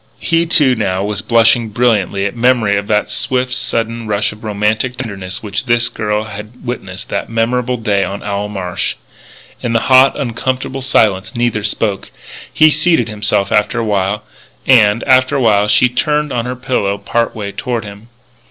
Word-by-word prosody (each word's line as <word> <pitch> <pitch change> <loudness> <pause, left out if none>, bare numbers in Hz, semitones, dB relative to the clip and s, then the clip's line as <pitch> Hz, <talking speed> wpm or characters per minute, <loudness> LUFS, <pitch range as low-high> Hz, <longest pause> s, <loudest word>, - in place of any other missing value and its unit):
He, 165 0 0
too, 150 -6 +4
now 95 -5 -1
was 105 0 -2
blushing 115 0 +3
brilliantly 105 -4 +1
at 100 - -3
memory 120 -4 +2
of 100 0 -2
that 105 -1 0
swift, 130 0 -1
sudden 115 -2 -2
rush 105 0 0
of 105 +1 -14
romantic 110 +4 -1
tenderness 95 -2 -6
which 105 +4 -4
this 120 -1 +2
girl 105 -1 -2
had 110 +4 -10
witnessed 100 -4 -6
that - - -3
memorable 125 +2 0
day 105 -4 0
on 100 +1 -5
Owl 100 0 -3
Marsh. 90 -3 -3 0.7
In 115 - -2
the 115 - +3
hot, 130 +2 +5
uncomfortable 130 +1 -3
silence, 105 -4 +1
neither 120 -2 0
spoke. 105 -2 -2 0.4
He 155 0 +5
seated 155 -6 +2
himself 105 -2 0
after 105 +3 +1
a 115 - -1
while. 105 0 -1 0.4
And, 115 -4 +4
after 130 +2 +3
a 135 - +1
while, 105 -3 +3
she 125 - +4
turned 150 +4 -1
on 120 -1 -1
her 125 - -3
pillow 125 -6 -1
part 115 +4 -1
way 100 -2 -5
toward 120 +1 -3
him. 105 +1 -11
115 Hz, 170 wpm, -15 LUFS, 105-125 Hz, 0.7 s, hot